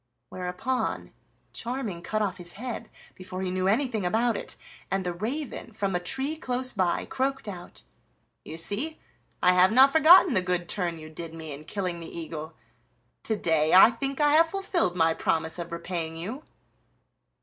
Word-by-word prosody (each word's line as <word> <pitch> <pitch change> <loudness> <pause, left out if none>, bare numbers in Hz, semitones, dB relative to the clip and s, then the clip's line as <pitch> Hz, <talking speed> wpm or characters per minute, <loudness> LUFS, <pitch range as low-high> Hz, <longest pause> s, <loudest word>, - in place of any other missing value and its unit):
Whereupon 185 +9 -3 0.4
Charming 230 -7 -4
cut 215 +4 -1
off 200 - -2
his 175 -1 0
head 230 0 -6 0.2
before 185 0 -7
he 185 - -2
knew 185 0 0
anything 225 0 +1
about 225 +5 +1
it, - - -5 0.3
and 190 0 -1
the 180 - -1
raven 235 - -5
from 200 -2 -2
a - - +1
tree 270 - 0
close 255 -2 -1
by 185 -4 0
croaked 270 -1 -2
out: 180 -3 -8 0.6
"You 160 - -8
see 235 - -3 0.5
I 180 - +6
have 180 +2 +5
not 265 +4 +7
forgotten 320 +1 +7
the 185 - +3
good 180 -1 -1
turn 175 -3 -1
you 155 0 -10
did 165 0 -7
me 160 -2 -7
in 145 +2 -9
killing 180 -1 -3
the 165 - -8
eagle. 160 -1 -7 0.7
To 220 - +1
day 160 -4 +2
I 190 +5 +9
think 270 +4 -4
I 295 -1 +4
have 325 +1 +5
fulfilled 375 - -1
my 165 -2 +3
promise 160 +1 -1
of 170 0 -6
repaying 170 -1 -4
you." 220 - -6
190 Hz, 170 wpm, -27 LUFS, 170-255 Hz, 0.7 s, I